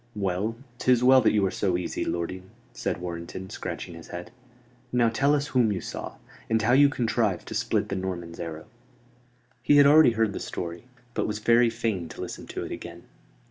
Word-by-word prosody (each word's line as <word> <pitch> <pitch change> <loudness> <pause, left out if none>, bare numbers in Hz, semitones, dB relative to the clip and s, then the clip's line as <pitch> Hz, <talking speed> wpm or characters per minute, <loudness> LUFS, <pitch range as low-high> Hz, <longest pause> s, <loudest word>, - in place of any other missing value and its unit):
"Well, 100 +2 -1 0.2
'tis 125 -1 +3
well 130 +1 +7
that 110 - +4
you 105 -2 +2
are 95 - 0
so 95 -4 0
easy, 90 - -3
lording," 90 +2 -4 0.2
said - - -3
Warrenton, 90 +2 -6
scratching - - -6
his 85 0 -11
head. 90 0 -8 0.6
"Now 120 -2 +3
tell 140 +6 +2
us 145 0 -2
whom 125 -6 +3
you 95 - -1
saw; - - -6 0.3
and 110 0 +3
how 115 +2 +2
you 140 +2 +7
contrived 115 -7 0
to - - -5
split - - 0
the 100 - -2
Norman's 90 -3 -5
arrow." 80 -2 -6 1.0
He 145 - +4
had 145 - +8
already 145 -3 +7
heard 110 -2 +1
the - - -4
story: 85 +3 -6 0.3
but - - -1
was 105 -1 -2
very 115 +2 +4
fain 110 -7 -2
to - - -11
listen - - -7
to - - -5
it - - -8
again. 85 0 -8
105 Hz, 195 wpm, -26 LUFS, 90-120 Hz, 1.0 s, had